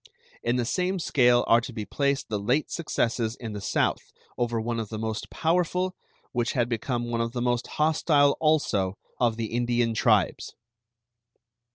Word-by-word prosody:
In 120 +1 0
the 125 -1 0
same 185 +8 0
scale 125 -7 +3
are 115 +1 +5
to 125 - -7
be 110 -3 -5
placed 140 +2 -1
the 105 -2 -1
late 125 +9 0
successes 120 -8 -1
in 115 -3 -6
the 105 - -5
South - - -1 0.2
over 120 -1 -1
one 115 +1 -2
of 110 -3 -4
the 110 - -5
most 110 0 -4
powerful, 180 +2 0 0.4
which 120 -2 -1
had 120 -2 +1
become 120 0 -2
one 115 0 0
of 115 0 -2
the 125 - -2
most 120 0 0
hostile 150 -2 +3
also, 105 -12 +1 0.2
of 115 -2 +2
the 115 -1 -4
Indian 120 -1 +1
tribes. 110 - +1
120 Hz, 170 wpm, -26 LUFS, 115-140 Hz, 0.4 s, are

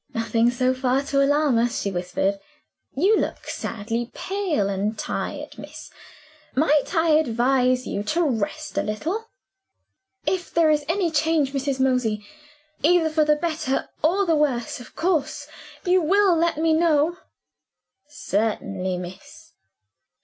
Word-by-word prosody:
"Nothing, 230 +1 +2
so 255 +1 +1
far, 260 +1 0
to 275 0 +1
alarm 290 -3 +3
us," 240 +2 0
she 200 - -1
whispered. 185 +2 -1 0.6
"You 380 +10 +4
look - - -3
sadly 230 +2 -4
pale 370 - -1
and 200 +2 -2
tired, - - -5
miss. - - -10 0.6
Might 300 +4 +2
I 325 0 +3
advise 255 -3 +2
you 200 - -3
to 340 +9 +1
rest 270 +4 -2
a - - +2
little?" 335 - -3 1.0
"If 365 -2 -1
there 325 -2 +4
is 300 -1 +1
any 345 -1 +1
change, 305 -2 +1
Mrs. 275 -1 -1
Mosey 250 -5 +1 0.6
either 325 0 +3
for 310 0 +3
the 300 0 +4
better 310 -4 -2
or 375 +6 +2
the 330 -3 +2
worse 260 -7 0
of 245 - -13
course 335 -4 -1 0.4
you 365 0 +4
will 385 +2 +4
let 335 -1 +1
me 320 +1 +2
know?" 320 0 +2 0.9
"Certainly, 200 -8 -2
miss." 180 +1 -10
285 Hz, 135 wpm, -23 LUFS, 230-325 Hz, 1.0 s, You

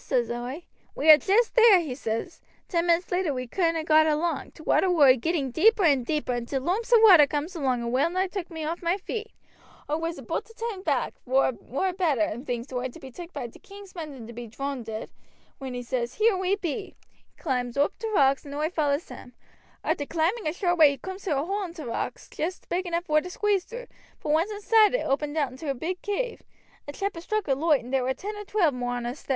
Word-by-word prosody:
says 240 -3 0
oi. 245 +7 -5 0.3
'We 310 +3 +6
are 305 - +10
jest 410 - +2
there,' 450 -7 +7
says 230 +6 -4
he. - - -35
'Ten 340 -1 0
minutes 340 +1 +2
later 355 -6 0
we 255 0 -3
couldn't 330 +6 0
ha' 315 - -5
got 315 0 +5
along.' 310 0 -1
T' 315 - -15
water 375 - +3
war 310 -6 +6
a 255 - +7
getting 275 0 -1
deeper 415 - +4
and 280 -6 +4
deeper, 300 0 -1
and 240 -1 -3
t' 275 - -5
loomps 365 - -1
of 460 -2 +7
water 350 -9 +9
cooms 300 +6 -3
along 260 -6 0
and 235 - -3
well 275 +6 +2
nigh 370 +2 0
took 375 -2 -5
me 320 -2 -6
off 325 +3 -3
my 345 +2 +1
feet. 435 +3 -5 0.6
Oi 300 - 0
was 330 +1 -3
aboot - - -4
to 455 - -18
turn 450 -4 -4
back, 290 -8 0
vor 265 +2 +3
it 255 - -7
war 365 +9 -2
better, 275 - 0
thinks 245 -1 -4
oi, 250 0 -1
to 250 - -12
be 265 - -10
took 345 +6 -9
by 250 - -5
t' 235 - -11
king's 400 -1 -13
men 325 -4 -6
than 255 -5 -10
to 235 - -10
be 240 0 -7
droonded, 230 -2 -5 0.5
when 260 -2 -6
he 245 - -4
says, 240 0 -3
'Here 435 -1 +3
we 375 +1 +1
be.' 385 0 -5 0.2
He - - -38
climbs 250 -4 -2
oop 285 +1 +2
t' 450 - -3
rocks 275 -9 +3
and 285 -1 -8
oi 305 +3 -1
follows 295 -2 0
him. 250 -1 -11 0.5
Arter 285 - -1
climbing 340 +6 0
a 305 - 0
short 350 -2 0
way 305 -2 +9
he 280 - -3
cooms 380 +4 -8
to 300 -7 +1
a 285 - -2
hole 390 -1 -3
i' 310 - -6
rocks, 235 -3 -4
joost 360 +4 -5
big 360 +1 -1
enough 340 0 -2
vor 305 -2 +3
to 360 - -8
squeeze 400 0 0
through, - - -8 0.4
but - - -3
once 325 +6 +2
inside 425 +2 +3
it - - -1
opened 290 +2 -1
out 285 -5 +1
into 280 +4 -7
a 275 - 0
big 350 +8 -4
cave. 455 +4 -3 0.5
A - - -4
chap 395 +6 -3
had 330 - -8
struck 430 +2 -2
a 275 - +3
loight, 295 0 +2
and 250 +3 -9
there 265 - +3
war 260 +1 -1
ten 420 +2 -6
or 415 0 -7
twelve 370 -8 +2
more 245 -1 -3
on 240 -1 -4
us 245 +4 -5
thar. - - -24
315 Hz, 250 wpm, -26 LUFS, 265-370 Hz, 0.6 s, are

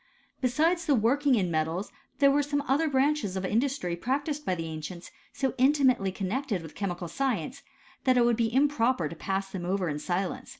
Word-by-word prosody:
Besides 320 +7 +1
the 285 -4 +4
wockiog 260 +4 +3
in 185 -4 0
metals 160 +5 -1 0.3
there 280 -1 +5
were 290 +1 +3
some 285 0 -1
olher 295 +2 +1
branches 270 -7 +1
of 190 - -2
industry 235 -3 0
practised 285 - -2
by 185 - +1
the 165 -1 -4
ancients, 160 +2 -7 0.2
so 270 -1 -1
in 265 +3 +5
timately 255 -9 +2
connected 200 +1 -2
with 160 - -10
chemical 180 -3 -4
science, 260 - -2 0.4
that 255 -1 +4
it 240 - +5
would 240 -1 +3
be 225 -1 0
improper 255 - +2
to 165 - -8
pass 195 +3 -3
them 185 -2 -5
over 185 +1 -1
in 145 0 -3
silence. 180 +3 -3
235 Hz, 195 wpm, -28 LUFS, 185-280 Hz, 0.4 s, there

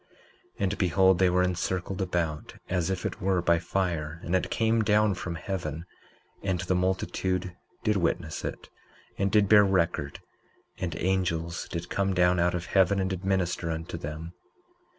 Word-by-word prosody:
19:14 - - -33
And 100 +1 0
behold, 95 0 +4
they 95 -1 +5
were 90 +1 +3
encircled 90 +1 -2
about 85 -5 -2
as 90 -1 0
if 95 -2 -2
it - - -4
were 95 -1 +2
by 85 -1 +3
fire; 85 -3 -2
and 85 - 0
it 90 - 0
came 115 0 +2
down 105 0 +3
from 90 -1 -5
heaven, 85 -3 -4 0.6
and 95 -2 -1
the 95 0 0
multitude 95 0 -1 0.3
did 105 -1 +2
witness 85 -3 -1
it, - - -6 0.5
and 100 0 +1
did 105 -1 +4
bear 105 0 +7
record; 85 -7 0 0.6
and 85 -3 -3
angels 85 -2 -1
did 85 0 -5
come 100 -1 0
down 90 0 +4
out 85 +1 +2
of 90 0 -3
heaven 95 +1 +3
and 95 0 0
did 95 0 -4
minister 90 -3 0
unto 80 +1 -4
them. 80 +2 -6
90 Hz, 170 wpm, -28 LUFS, 85-95 Hz, 0.6 s, bear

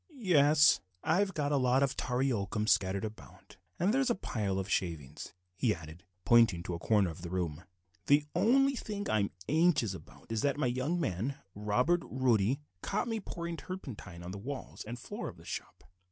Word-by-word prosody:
"Yes, 150 - +5 0.2
I've 190 +4 +2
got 145 -2 0
a 145 - +3
lot 130 +1 +3
of 135 - 0
tarry 130 +2 0
oakum 105 -1 -1
scattered 95 +1 +2
about, 110 0 -11 0.2
and 190 +5 +2
there 270 - +3
is 265 - +1
a 240 - +2
pile 105 - -2
of 95 -1 -2
shavings," 80 -6 -3 0.2
he 110 +1 +1
added, 80 +1 -11 0.2
pointing 105 -6 +5
to 90 - -4
a 85 - -4
corner 100 -2 +2
of 80 - -11
the 85 - -6
room; 85 -2 -3 0.4
"the 145 +1 +5
only 270 +9 +4
thing 205 -4 -4
I'm 100 -2 +2 0.2
anxious 150 - +3
about 85 +5 -13
is 110 -1 0
that 140 0 +1
my 145 - 0
young 130 +8 0
man 125 - -1 0.2
Robert 125 - +1
Roddy 125 0 +2 0.2
caught - - -1
me 225 -1 -1
pouring 170 -4 -5
turpentine 130 - -8
on 90 - -6
the 100 - -6
walls 135 +5 -6
and 120 +3 -6
floor - - -6
of - - -12
the - - -16
shop. - - -7
125 Hz, 190 wpm, -32 LUFS, 95-160 Hz, 0.4 s, Yes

